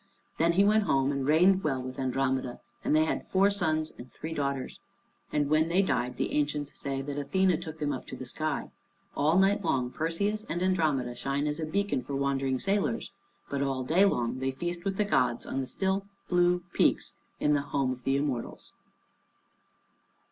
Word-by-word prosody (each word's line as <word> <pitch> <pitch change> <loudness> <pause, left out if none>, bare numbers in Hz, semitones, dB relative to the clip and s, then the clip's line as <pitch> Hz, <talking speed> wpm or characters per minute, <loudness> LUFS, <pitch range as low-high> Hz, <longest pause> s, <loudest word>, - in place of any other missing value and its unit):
Then 170 +1 +4
he 195 +3 +5
went 215 0 +4
home 135 -3 +2
and 140 -1 -2
reigned 185 +5 +5
well 135 -4 0
with 130 +1 -6
Andromeda, 130 -1 -1 0.2
and - - +2
they 155 0 +4
had - - -2
four 195 +2 +4
sons 155 -5 0
and 125 0 -11
three 160 +1 -6
daughters. 140 -3 -3 0.5
And 145 -1 +1
when 155 +2 +3
they 185 +3 +3
died, 125 -9 -1
the - - -1
ancients 145 -1 -1
say 135 -1 -3
that 145 0 -5
Athené 180 +3 +1
took 160 -1 -7
them 145 -2 -1
up 130 - -6
to - - -6
the - - -7
sky. - - -2 0.4
All 155 +5 +3
night 200 +2 +3
long 125 -6 0
Perseus 200 +8 -1
and 175 +2 -2
Andromeda 155 -10 +1
shine 140 +4 -2
as 150 +1 -2
a 160 - -2
beacon 200 -4 0
for 140 - -5
wandering 135 -1 0
sailors, 200 - -1 0.4
but 140 -1 -2
all 135 -2 -1
day 165 +9 +3
long 125 -10 +1
they 130 0 0
feast 175 +6 -4
with 195 -1 -1
the 210 - +2
gods, 125 - +1
on - - -3
the 130 - -2
still 195 +4 -1 0.2
blue 175 0 +3
peaks - - +2 0.3
in 150 - +3
the 145 - +2
home 140 -2 -1
of 130 -1 -7
the 135 +2 +2
Immortals. 140 -5 -3
150 Hz, 190 wpm, -29 LUFS, 135-180 Hz, 0.5 s, he